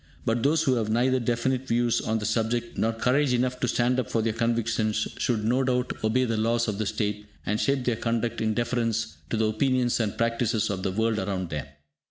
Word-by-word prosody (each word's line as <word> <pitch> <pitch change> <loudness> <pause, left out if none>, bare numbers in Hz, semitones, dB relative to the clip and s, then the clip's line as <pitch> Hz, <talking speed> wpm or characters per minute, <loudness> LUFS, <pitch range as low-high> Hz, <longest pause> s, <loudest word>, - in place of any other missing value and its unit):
But 115 +1 +1
those 155 +5 +3
who 130 - +3
have 110 -2 -1
neither 125 +4 +2
definite 125 +2 -1
views 120 0 +2
on 110 +1 0
the 105 - -3
subject 115 +2 -1
nor 115 - +1
courage 125 +4 +1
enough 125 +1 0
to 125 - 0
stand 125 +1 +1
up 125 - -3
for 115 - 0
their 115 -1 0
convictions 115 -2 0
should 115 -4 0
no 125 +4 +2
doubt 125 -1 0
obey 120 +4 +2
the 115 -2 -1
laws 115 +2 +1
of 105 -1 -2
the 110 - -1
state, 105 0 -2 0.2
and 105 +2 0
shape 135 -2 +1
their 120 -3 +1
conduct 115 0 -1
in 110 -1 0
deference 115 -2 -1
to 115 - -1
the 110 - +2
opinions 125 +3 +1
and 110 -3 -1
practices 115 -2 0
of 95 -2 -3
the 95 - -1
world 110 +2 0
around 95 -3 -3
them. 75 -1 -4
115 Hz, 220 wpm, -26 LUFS, 110-125 Hz, 0.2 s, those